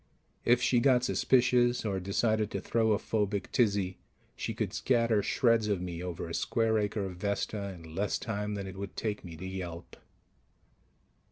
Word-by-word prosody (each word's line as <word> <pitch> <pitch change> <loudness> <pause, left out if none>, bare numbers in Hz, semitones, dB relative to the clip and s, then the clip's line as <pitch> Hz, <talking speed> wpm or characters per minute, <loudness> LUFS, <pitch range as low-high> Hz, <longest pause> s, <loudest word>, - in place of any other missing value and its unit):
If 120 +1 +4
she 125 -1 +4
got 125 -1 +4
suspicious 125 -2 +3
or 100 -3 0
decided 110 +3 +1
to - - -3
throw 110 -1 +2
a - - +2
phobic 105 -2 -1
tizzy, 100 -5 +1 0.4
she - - -4
could - - -2
scatter 115 -4 +2
shreds 115 0 +2
of 100 -3 +1
me 90 -1 -5
over 90 -2 -4
a 85 - -6
square 110 +3 +1
acre 105 -1 -1
of 90 -2 -6
Vesta 100 +1 -2
in 80 -3 -12
less 100 +4 0
time 105 -2 -3
than 100 -1 -4
it 95 0 -8
would 100 0 -7
take 105 -2 -2
me 85 -3 -9
to 95 - -7
yelp. 90 -3 -6
105 Hz, 175 wpm, -30 LUFS, 95-115 Hz, 0.4 s, If